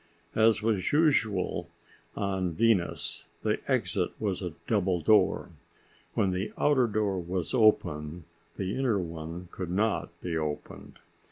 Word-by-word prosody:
As 110 -1 +4
was 105 -5 +1
usual 140 - +2 0.5
on 95 -3 -1
Venus, 110 -2 +1 0.2
the - - +1
exit - - 0
was 100 -4 -1
a 90 -4 -4
double 95 -4 +1
door. 105 +7 +3 0.6
When 95 - +2
the 95 +3 -2
outer 135 -4 +3
door 105 -3 0
was 85 -2 -3
open, 85 -7 +2 0.3
the 95 +1 -2
inner 130 -5 +1
one 85 0 -5
could 90 -2 -5
not 105 +5 0
be 85 -2 -3
opened. 75 -2 -5
95 Hz, 125 wpm, -29 LUFS, 85-110 Hz, 0.6 s, As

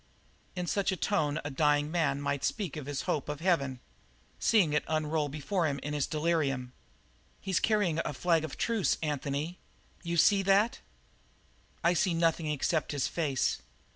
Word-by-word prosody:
In 180 -1 -2
such 195 +3 0
a 190 - -2
tone 150 -1 0
a 145 - -3
dying 145 +1 +2
man 160 -5 +1
might 140 -1 -2
speak 195 -9 -2
of 150 -3 -6
his 145 -2 -3
hope 150 - -2
of 150 -1 -4
heaven 140 -8 +1 0.6
seeing 190 -10 +3
it 150 - +2
unroll 155 -1 0
before 155 +5 -1
him 140 -2 -1
in 150 - -3
his 145 -2 0
delirium. 150 -6 0
"But - - -33
he's 190 -3 +1
carrying 205 -7 +1
the - - -3
flag 165 +2 +1
of 160 - -6
truce, 230 -5 +1
Anthony. 150 +3 -2 0.4
You 170 -1 -2
see 200 +5 +5
that?" 200 +4 +3 1.0
"I 170 +1 +4
see 175 0 +1
nothing 165 -1 +1
except 150 +1 0
his 140 -2 0
face. 145 -6 0
155 Hz, 170 wpm, -30 LUFS, 145-175 Hz, 1.0 s, see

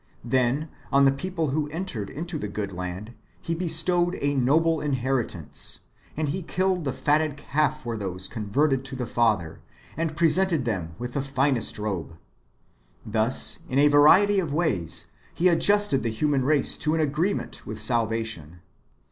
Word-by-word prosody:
Then, 130 +5 +1 0.2
on 140 0 +5
the 135 - +6
people 165 +2 -2
who 150 +1 0
en 165 +5 -4
tered 110 - -5
into 165 +2 -5
the 105 - -3
good 100 -1 -4
land 90 +5 -6 0.3
He 165 - -3
bestowed 175 +1 +2
a 145 0 0
noble 155 +5 +2
inheritance; 130 - -1 0.4
and 155 -2 -1
He 185 +6 -2
killed 185 0 -1
the 135 - 0
fatted 150 +1 +1
calf 150 +1 -1
for 120 -2 -3
those 95 -3 -5
converted 130 +5 0
to 135 - -6
the 125 -1 -3
Father, 105 -10 0 0.3
and 160 -1 -2
presented 170 -3 +3
them 90 -8 -3
with 120 0 -5
the 140 - -1
finest 135 -2 0
robe.^ 95 -6 -4 0.9
Thus, 110 +3 +2
in 130 - -1
a 145 +1 +6
variety 190 +8 +6
of 170 -6 -2
ways, 85 - -1 0.2
He 180 - +3
adjusted 200 -2 +3
the 115 - -1
human 135 +3 0
race 145 -1 +2
to 155 +1 0
an - - 0
agree 155 +6 +1
ment - - -7
with 110 0 -5
salvation. 110 -7 -2
140 Hz, 165 wpm, -25 LUFS, 110-160 Hz, 0.9 s, the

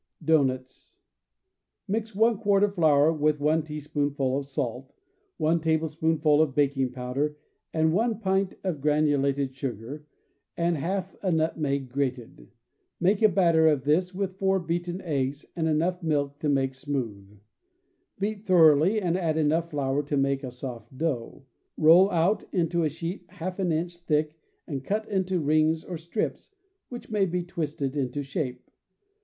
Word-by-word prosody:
Doughnuts. 130 -5 0 0.5
— - - -57
Mix 220 +1 -2
one 220 0 +3
quart 200 -2 +3
of 205 -1 +2
flour 155 -3 +4
with 150 -1 +1
one 155 +2 +2
tea 150 0 -6
spoonful 145 -3 -1
of 140 0 -3
salt, 130 -1 -4 0.5
one 160 +2 +2
tablespoonful 160 -1 +2
of 145 -4 0
baking 135 -3 +1
powder 130 +4 -3 0.3
and 160 0 +2
one 225 +2 +1
pint 190 -2 0
of 175 -7 -2
granulated 140 -2 +1
sugar, 135 +3 -6 0.5
and 170 0 +1
half 185 +5 -3
a 190 - 0
nutmeg 155 -4 0
grated. 125 - -4 0.5
Make 195 +4 +2
a 215 - +6
batter 170 -4 +4
of 150 -4 +2
this 175 +5 +2
with 190 0 -4
four 190 0 +2
beaten 175 +2 -3
eggs 140 -3 -2
and 165 -2 0
enough 170 +4 0
milk 145 -3 -1
to 150 - -1
make 135 -2 +1
smoothe. 115 -8 -5 0.8
Beat 205 +1 -2
thoroughly 175 0 +5
and 175 -4 0
add 165 -4 0
enough 160 +2 +1
flour 140 -2 0
to 145 0 -2
make 135 0 +1
a 130 - -4
soft 125 +1 -8
dough. 135 -4 -3 0.3
Roll 170 +5 +7
out 185 +4 +1
into 170 -1 +1
a 155 - +2
sheet 165 +5 -6
half 185 0 -6
an 180 -3 +1
inch 170 +2 -2
thick 155 -2 0 0.3
and 135 -3 -5
cut 210 +8 -2
into 190 -2 0
rings 155 +1 +2
or 175 -3 -6
strips, 175 - -4 0.3
which 240 -2 -9
may 205 -2 +2
be 180 0 -2
twisted 150 -5 -3
into 140 0 -2
shape. 130 -4 -4
155 Hz, 155 wpm, -26 LUFS, 140-180 Hz, 0.8 s, Roll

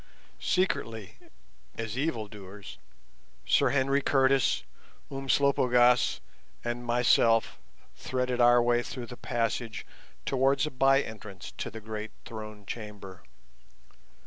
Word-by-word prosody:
Secretly, 115 - -1 0.6
as 115 -1 -4
evildoers, 105 -8 -5 0.7
Sir - - +3
Henry 135 0 +2
Curtis, 135 -1 +3 0.5
Umslopogaas, 130 -3 +3 0.4
and 120 0 -3
myself 120 -1 +3 0.4
threaded 125 -1 -1
our 120 0 +6
way 120 0 +3
through 120 0 -6
the 125 - -9
passages 115 -2 -2 0.4
towards 135 +2 +2
a 155 - -4
by 135 +2 +4
entrance 105 -3 -9
to - - -3
the 110 - -8
great 110 0 -5 0.2
Throne 110 -2 -8
Chamber. 105 -4 -8
120 Hz, 100 wpm, -29 LUFS, 110-130 Hz, 0.7 s, our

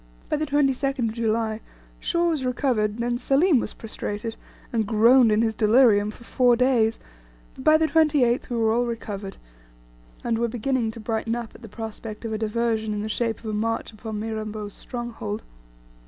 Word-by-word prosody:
By - - +1
the 310 +1 -2
22nd 275 -4 +1
July 225 -1 -1 0.4
Shaw 345 0 +1
was 300 -5 -2
recovered, 245 -5 0
then 240 0 -1
Selim 280 +3 +3
was 215 - -4
prostrated, 225 0 -5 0.4
and 220 -3 +1
groaned 230 +2 +5
in 215 +2 +3
his 225 -1 +1
delirium 215 -1 +4
for 215 - -11
four 245 0 +3
days, 235 -3 +2 0.5
but 260 - -10
by 310 +2 +6
the 320 - +2
28th 295 -7 +2
we 240 - -2
were 225 -1 +2
all 240 +2 +1
recovered, 205 -4 -5 0.9
and 230 -1 0
were 235 - +1
beginning 240 +1 -1
to 220 - -8
brighten 225 +1 -2
up 235 -2 -6
at - - -15
the 225 - -10
prospect 220 0 -7
of 220 - -3
a 215 - -2
diversion 220 -1 -1
in 205 - -3
the 215 - -4
shape 225 +1 -1
of - - -12
a 215 - -3
march 225 +2 -2
upon 215 0 -6
Mirambo's 215 -1 -4
stronghold. 230 -3 -5
230 Hz, 180 wpm, -24 LUFS, 220-250 Hz, 0.9 s, by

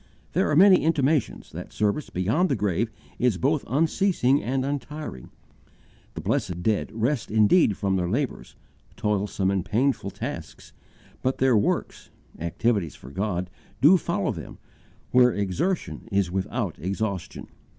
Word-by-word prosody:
There - - +2
are 150 - +2
many 190 +3 +8
intimations 150 -3 +1
that - - -8
service 105 +8 -1
beyond 110 - +1
the - - +2
grave 105 +2 0 0.3
is 120 -6 +2
both 145 +5 +1
unceasing 155 - +2
and 130 +1 -1
untiring: 145 - -5 0.9
the 80 - -5
blessed 95 - -1
dead 110 0 0
"rest 115 +3 -1
indeed 110 - +4
from 95 -2 0
their 90 -1 -1
labours" 130 +7 -3 0.4
toilsome 100 -2 0
and 95 -2 0
painful 110 +3 0
tasks - - -7 0.5
"but 130 +1 0
their 130 -2 +3
works" 100 - -1 0.3
activities 90 +1 0
for 65 - -12
God 95 0 -2 0.3
"do 150 +10 +7
follow 170 - 0
them," - - -8 0.5
where 125 0 +6
exertion 120 - -2
is 100 -3 +1
without 95 -6 -2
exhaustion. 95 +1 -3
110 Hz, 135 wpm, -25 LUFS, 95-140 Hz, 0.9 s, many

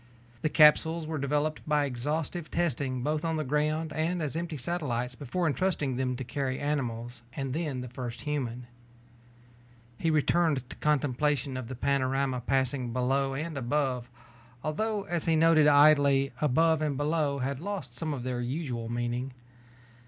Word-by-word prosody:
The 155 - +1
capsules 160 +2 +5
were 155 -1 -3
developed 150 +2 0
by 150 -1 +3
exhaustive 150 +6 -3
testing 135 -6 -1
both 150 +2 -1
on 165 -1 0
the 155 - -1
ground 150 +3 0
and 165 +3 0
as 150 -2 -2
empty 165 -2 -3
satellites 130 -4 -2
before 145 +7 -3
entrusting 155 -4 0
them 130 0 -1
to 130 - -5
carry 130 +1 -2
animals 120 -5 -3
and 135 -2 -3
then 150 -5 -2
the 125 - -6
first 125 -1 -6
human. 125 -5 -3 1.3
He 165 - +1
returned 155 -3 +2
to - - -7
contemplation 145 -2 +1
of 130 -2 -4
the 130 - -6
panorama 135 0 0
passing 130 0 0
below 135 +2 0
and 155 +3 -4
above, 125 -1 -1 0.5
although 205 +7 -1
as 175 -3 -2
he 165 - +3
noted 160 -1 +5
idly, 145 -2 +5
above 160 +2 +3
and 150 -3 0
below 145 -1 0
had 135 0 -2
lost 175 -9 -5
some 155 +4 -3
of 135 -4 -4
their 125 -1 -2
usual 120 -3 -3
meaning. 120 +2 -2
145 Hz, 155 wpm, -29 LUFS, 130-155 Hz, 1.3 s, capsules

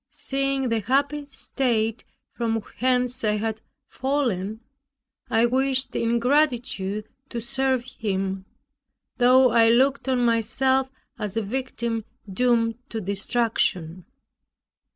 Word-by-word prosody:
Seeing 275 -1 -1
the 230 -1 +1
happy 280 +6 0
state 235 -5 -1 0.3
from 225 -2 -1 0.2
whence 250 -1 +1
I 210 -1 +2
had 220 +1 -2 0.2
fallen, 235 -7 -2 0.7
I 225 +1 +3
wished 265 +2 +1
in 230 +1 +1
gratitude 235 -6 0 0.2
to 235 - -4
serve 260 +1 0
Him, 195 -6 -3 0.7
though 255 0 +5
I 225 0 +5
looked 265 +3 +3
on 250 -2 +2
myself 260 +4 +2 0.3
as 210 0 -4
a 225 - +1
victim 235 -1 -3 0.2
doomed 230 +2 +1
to 225 - -4
destruction. 195 -4 -1
235 Hz, 110 wpm, -24 LUFS, 220-260 Hz, 0.7 s, though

